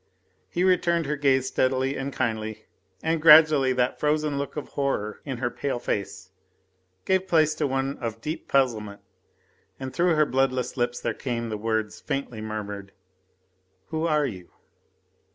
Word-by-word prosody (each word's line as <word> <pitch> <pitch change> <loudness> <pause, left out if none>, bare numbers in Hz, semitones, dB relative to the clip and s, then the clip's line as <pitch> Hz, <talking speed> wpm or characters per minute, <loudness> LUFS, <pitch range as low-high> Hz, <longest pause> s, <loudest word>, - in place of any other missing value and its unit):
He 175 - -1
returned 170 -3 +2
her 150 +2 -1
gaze 135 -3 +2
steadily 130 +1 +1
and 135 +1 -3
kindly, 110 -4 -3 0.4
and 160 0 0
gradually 155 -4 +7
that 125 0 0
frozen 150 -1 0
look 140 +2 -5
of 150 - -5
horror 120 -7 -2
in 135 -4 -4
her 120 0 -2
pale 140 -3 -2
face 95 -4 -4 0.7
gave 190 0 +1
place 155 -3 +3
to 155 -1 -1
one 135 +1 -2
of 115 -2 -4
deep 155 +7 -5
puzzlement, 110 -7 0 0.8
and 130 -1 -6
through 175 -1 +2
her 155 0 +4
bloodless 130 -2 0
lips 120 -1 -1
there - - -2
came 120 -3 -3
the 110 - -3
words, 110 0 -2
faintly 135 -6 -4
murmured: 105 -2 -6 1.0
"Who 160 +1 -1
are 150 -2 +2
you?" 95 -9 -7
135 Hz, 150 wpm, -25 LUFS, 115-150 Hz, 1.0 s, gradually